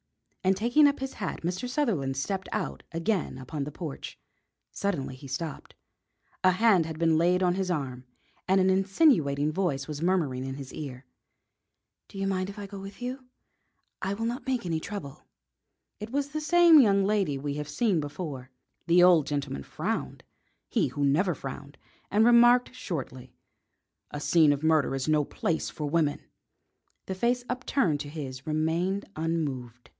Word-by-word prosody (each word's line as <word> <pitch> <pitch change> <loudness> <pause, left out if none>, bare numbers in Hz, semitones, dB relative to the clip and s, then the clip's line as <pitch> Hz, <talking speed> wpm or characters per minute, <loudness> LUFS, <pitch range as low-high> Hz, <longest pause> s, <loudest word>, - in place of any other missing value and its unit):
And 190 0 +3
taking 245 +8 +5
up 280 - 0
his 270 0 -4
hat 195 - -4
Mr. 185 +9 -2
Sutherland 190 - 0
stepped 190 +7 -3
out - - -3
again 170 -1 -1
upon 140 +3 -5
the 145 - -5
porch. 150 -2 -7 0.5
Suddenly 160 -10 -2
he 135 +2 -11
stopped. 145 +3 -5 0.7
A 185 - +6
hand 190 -4 +4
had 160 -1 -6
been 165 -1 +3
laid 180 +2 +3
on 180 -1 +3
his 190 0 -2
arm 130 -7 -3 0.4
and 190 +1 +4
an 190 0 +4
insinuating 185 - +3
voice 155 -6 -1
was 150 -1 -5
murmuring 165 -8 0
in 135 0 -5
his 135 -2 -9
ear: 130 -3 -7 1.0
"Do - - -12
you 195 - -1
mind 190 -1 -1
if 200 - -9
I 205 - -6
go 200 0 -8
with 195 +1 -9
you? 255 +1 -5 0.7
I 195 +1 -1
will 225 +2 -3
not 245 +4 -4
make 255 -6 -1
any 165 -2 -1
trouble." 160 -6 -8 0.7
It 210 +1 -6
was 280 +3 -1
the 310 +1 -4
same 340 0 +7
young 200 -4 +4
lady 195 -9 +1
we 140 +1 -3
have 150 0 -5
seen 185 +3 +1
before. 145 -3 -6 0.4
The 175 +1 +6
old 175 -5 +6
gentleman 140 - -3
frowned - - -4 0.4
he - - +1
who 145 -1 -1
never 165 +5 +2
frowned 140 +1 -8 0.3
and 215 +2 +4
remarked 240 +1 +6
shortly: 135 - -6 0.7
"A 145 - -6
scene 155 0 +4
of 145 +1 -1
murder 155 -4 +3
is 135 +1 -3
no 155 -1 +3
place 160 +3 -2
for 150 - -5
women." 150 -1 0 0.8
The 190 - -3
face 240 +6 0
upturned 250 - 0
to 145 0 -6
his 140 -2 -7
remained 165 +6 0
unmoved. 140 -7 -3
170 Hz, 170 wpm, -28 LUFS, 145-200 Hz, 1.0 s, same